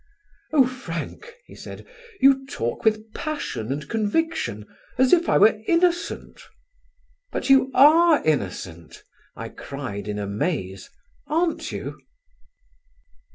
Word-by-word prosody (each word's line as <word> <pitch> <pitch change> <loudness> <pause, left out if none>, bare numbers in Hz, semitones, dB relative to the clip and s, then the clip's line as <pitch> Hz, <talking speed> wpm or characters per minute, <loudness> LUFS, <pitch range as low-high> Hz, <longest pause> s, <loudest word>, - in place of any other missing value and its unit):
"Oh, 285 -4 +5
Frank," 255 - -7
he - - -15
said, - - -10 0.3
"you 270 0 +5
talk 120 - -4
with 220 -1 0
passion 290 - -4
and 145 +1 -4
conviction, 215 - -1 0.3
as 260 0 +4
if 345 -1 +4
I - - +4
were 215 +1 +5
innocent." 345 0 0 0.9
"But - - -1
you 265 -1 +5
are 315 +3 +6
innocent," 90 - -3 0.3
I - - -7
cried 115 -8 -7
in 105 0 -3
amaze, 100 - -3 0.4
"aren't 330 +2 -1
you?" - - -6
220 Hz, 110 wpm, -23 LUFS, -, 0.9 s, are